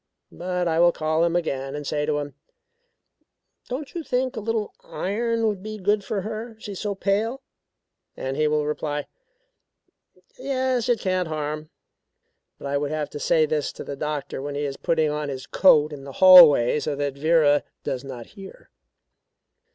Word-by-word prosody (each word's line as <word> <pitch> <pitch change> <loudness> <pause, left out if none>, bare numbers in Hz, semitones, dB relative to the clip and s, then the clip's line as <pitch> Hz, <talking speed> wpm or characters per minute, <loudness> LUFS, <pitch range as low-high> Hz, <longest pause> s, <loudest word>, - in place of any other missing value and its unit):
But 180 0 -2
I 165 0 +1
will 175 0 +6
call 155 0 0
him 170 0 +1
again 135 -5 -2
and 145 0 -6
say 150 +1 -1
to 150 -1 +1
him: 145 -1 -5 1.4
'Don't 265 +3 -5
you 345 - -4
think 255 -3 -1
a - - -3
little 220 0 -2
iron 230 +4 -2
would 205 -4 -1
be 215 +1 -6
good 205 +1 +1
for 200 -1 -3
her, 220 +3 -6
she 210 - -8
is 195 - -7
so 205 -2 -2
pale?' 220 +7 -1 0.7
And 130 0 -3
he 155 +1 +2
will 150 0 +1
reply: 150 -1 -3 1.3
'Yes, 260 -2 -1
it 240 -3 +2
can't 185 -3 -1
harm.' 155 0 -4 0.9
But - - -11
I 140 0 0
would 145 0 -2
have 155 -1 -3
to 145 - -6
say 160 +1 +3
this 150 -1 -1
to - - -8
the 140 - -6
doctor 150 -2 -4
when 145 +1 -5
he 145 - -2
is 140 -1 -4
putting 160 -1 0
on 150 -1 -3
his 130 -2 -6
coat 155 -5 +4
in 140 -2 -9
the 140 0 -9
hallway 165 -9 +8
so 150 -1 -2
that 140 -1 -2
Vera 145 -1 +3 0.2
does 130 0 -3
not 125 -4 -8
hear. 200 - -13
160 Hz, 180 wpm, -24 LUFS, 145-210 Hz, 1.4 s, hallway